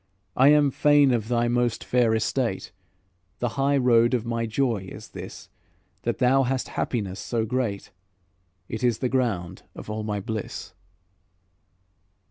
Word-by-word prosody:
I 130 Hz, -, +5 dB
am 145 Hz, -1 st, +5 dB
fain 145 Hz, 0 st, +4 dB
of 115 Hz, -3 st, 0 dB
thy 120 Hz, 0 st, +1 dB
most 120 Hz, -1 st, 0 dB
fair 120 Hz, -3 st, +2 dB
estate; 115 Hz, -1 st, -1 dB, 0.7 s
The 120 Hz, -, -1 dB
high 140 Hz, +3 st, +1 dB
road 120 Hz, -1 st, +4 dB
of 120 Hz, -2 st, -2 dB
my 115 Hz, 0 st, -2 dB
joy 110 Hz, -5 st, -1 dB
is -, -, -10 dB
this, -, -, -9 dB, 0.5 s
That -, -, -2 dB
thou 130 Hz, +1 st, +4 dB
hast 130 Hz, 0 st, -1 dB
happiness 100 Hz, -6 st, -3 dB
so 115 Hz, -2 st, -2 dB
great; 110 Hz, -4 st, -2 dB, 0.8 s
It 110 Hz, -, -5 dB
is 120 Hz, -2 st, +2 dB
the 125 Hz, -, -1 dB
ground 100 Hz, -9 st, -1 dB
of -, -, -8 dB
all 110 Hz, 0 st, -3 dB
my 105 Hz, -1 st, -2 dB
bliss." 110 Hz, 0 st, -5 dB
120 Hz, 145 wpm, -25 LUFS, 110-130 Hz, 0.8 s, I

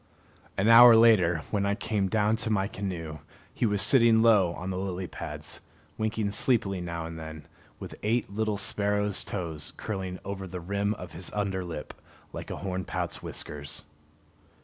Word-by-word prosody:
An 100 Hz, -, +1 dB
hour 115 Hz, +1 st, +10 dB
later, 95 Hz, -8 st, +5 dB
when 100 Hz, -2 st, 0 dB
I 100 Hz, 0 st, +1 dB
came 105 Hz, -3 st, -1 dB
down 110 Hz, +1 st, +2 dB
to 110 Hz, -, +1 dB
my 100 Hz, -3 st, +1 dB
canoe, 85 Hz, -7 st, -5 dB, 0.3 s
he 120 Hz, -, 0 dB
was 105 Hz, -2 st, +3 dB
sitting 115 Hz, -4 st, +6 dB
low 105 Hz, -7 st, +5 dB
on 95 Hz, +1 st, -5 dB
the 90 Hz, -, -3 dB
lily 95 Hz, -1 st, -3 dB
pads, -, -, -7 dB, 0.4 s
winking 110 Hz, -1 st, -1 dB
sleepily 105 Hz, -4 st, +1 dB
now 85 Hz, -1 st, -4 dB
and 80 Hz, 0 st, -7 dB
then, 80 Hz, -2 st, -9 dB, 0.3 s
with -, -, -8 dB
eight 115 Hz, +2 st, 0 dB
little 105 Hz, +1 st, -2 dB
sparrow's 105 Hz, 0 st, 0 dB
toes 80 Hz, -6 st, -5 dB
curling 95 Hz, -4 st, -4 dB
over 95 Hz, -1 st, -5 dB
the 90 Hz, 0 st, -6 dB
rim 100 Hz, +4 st, -1 dB
of 90 Hz, -3 st, -9 dB
his 85 Hz, +1 st, -6 dB
under 100 Hz, -3 st, -1 dB
lip, 85 Hz, -4 st, -7 dB, 0.4 s
like -, -, -7 dB
a -, -, -5 dB
hornpout's 95 Hz, -1 st, -4 dB
whiskers. 70 Hz, -1 st, -5 dB
100 Hz, 165 wpm, -28 LUFS, 90-105 Hz, 0.4 s, hour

